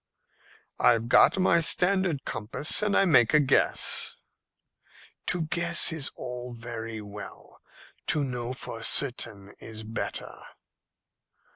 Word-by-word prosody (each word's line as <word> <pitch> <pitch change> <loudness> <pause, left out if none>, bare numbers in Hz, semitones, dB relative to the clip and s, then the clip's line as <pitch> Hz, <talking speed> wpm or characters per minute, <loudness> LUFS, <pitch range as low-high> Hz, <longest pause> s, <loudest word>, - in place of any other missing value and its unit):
"I've 115 -1 +3
got - - +5
my 185 -2 +3
standard 180 -3 +1
compass, 120 - 0
and 210 -1 +1
I 195 - +4
make 130 -6 +4
a - - +7
guess." 140 -3 0 1.1
"To 175 -2 +3
guess 170 +1 +1
is 150 -4 -2
all 125 0 -7
very 115 -1 -7
well. 105 0 -11 0.5
To 150 - +1
know 125 -2 -4
for 115 -3 -7
certain 115 -6 +1
is 110 -1 -9
better." 110 +1 -5
125 Hz, 115 wpm, -27 LUFS, 115-165 Hz, 1.1 s, a